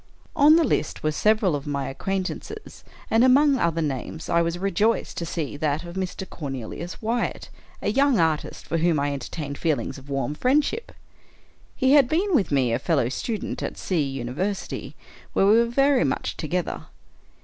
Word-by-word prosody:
On 305 0 +7
the 335 - +5
list 245 - -1
were 155 - +2
several 210 0 +2
of 145 +1 -5
my 140 -1 -2
acquaintances; 195 - -5 0.3
and 225 +2 +5
among 270 +1 +5
other 165 -1 +1
names, 145 +2 -4
I 170 - +3
was 170 +1 -1
rejoiced 195 +4 0
to 170 - -3
see 155 -4 -3
that 150 0 -1
of 170 0 -8
Mr. 190 0 -4
Cornelius 145 - -6
Wyatt, 235 +2 -2 0.3
a - - +1
young 275 0 +3
artist, 160 -2 0
for 165 - -1
whom 165 -2 +2
I 145 0 0
entertained 140 +1 -5
feelings 145 -5 -1
of 135 +2 -16
warm 135 0 -1
friendship. 295 - +1 0.8
He 260 -1 +2
had 280 -3 +6
been 370 +5 +1
with 200 - +2
me 130 -4 +2
a 115 - +1
fellow 140 -5 +1
student 215 - -4
at - - -4
C 180 -5 0
University, 135 +9 -3 0.4
where - - +3
we 215 +3 +6
were 235 - +4
very 275 +2 +3
much - - -1
together. - - -3
175 Hz, 170 wpm, -24 LUFS, 145-235 Hz, 0.8 s, On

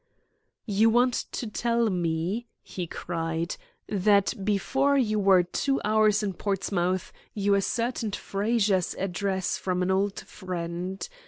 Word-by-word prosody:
"You 215 +1 +3
want 245 +2 +3 0.2
to - - -3
tell 230 0 0
me," 175 +6 -1 0.2
he 180 -2 -5
cried, 165 0 -3 0.3
"that 200 0 +3
before 270 +8 +2
you 215 -5 +1
were 190 -2 +5
two 270 +10 -1
hours 215 0 +3
in 200 -2 -1
Portsmouth 185 -2 -1 0.2
you 200 -1 +2
ascertained 230 +1 -1
Frazer's 200 -3 0
address 190 0 -1
from 180 -1 -1
an 185 - +1
old 195 +1 0
friend. 180 0 -5
200 Hz, 120 wpm, -27 LUFS, 180-215 Hz, 0.3 s, were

